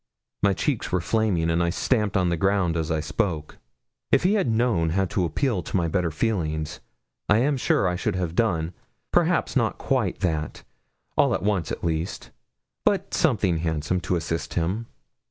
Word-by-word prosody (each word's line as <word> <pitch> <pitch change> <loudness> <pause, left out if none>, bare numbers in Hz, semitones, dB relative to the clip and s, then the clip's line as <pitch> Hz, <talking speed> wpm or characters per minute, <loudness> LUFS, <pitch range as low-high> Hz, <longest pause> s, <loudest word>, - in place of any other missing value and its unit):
My 100 -1 +4
cheeks 135 +3 -1
were 90 - +2
flaming, 90 -4 +1
and 85 +1 +1
I 85 - +2
stamped 105 +2 +1
on 90 -2 +2
the 85 - +1
ground 95 -1 +1
as 80 -2 -1
I 80 -1 0
spoke. 80 0 -2 0.5
If - - +4
he 185 +3 +4
had 205 -10 +2
known 110 -8 +2
how 95 +4 +1
to 90 0 0
appeal 105 - 0
to 90 - -2
my 85 -2 +1
better 90 +1 0
feelings, 80 -4 -2 0.5
I 100 - +5
am 140 +5 +2
sure 120 -6 +2
I 90 - 0
should - - -1
have 90 -3 -2
done, 85 -5 0 0.4
perhaps - - +2
not - - +1
quite - - -1
that, 80 -4 -2 0.5
all - - +3
at - - -4
once 100 -4 0
at - - -5
least, 80 +2 -2 0.5
but - - +1
something 85 -3 +2
handsome, 80 +1 -1
to 90 - 0
assist 80 0 -3
him. 95 +7 -1
90 Hz, 180 wpm, -25 LUFS, 80-100 Hz, 0.5 s, I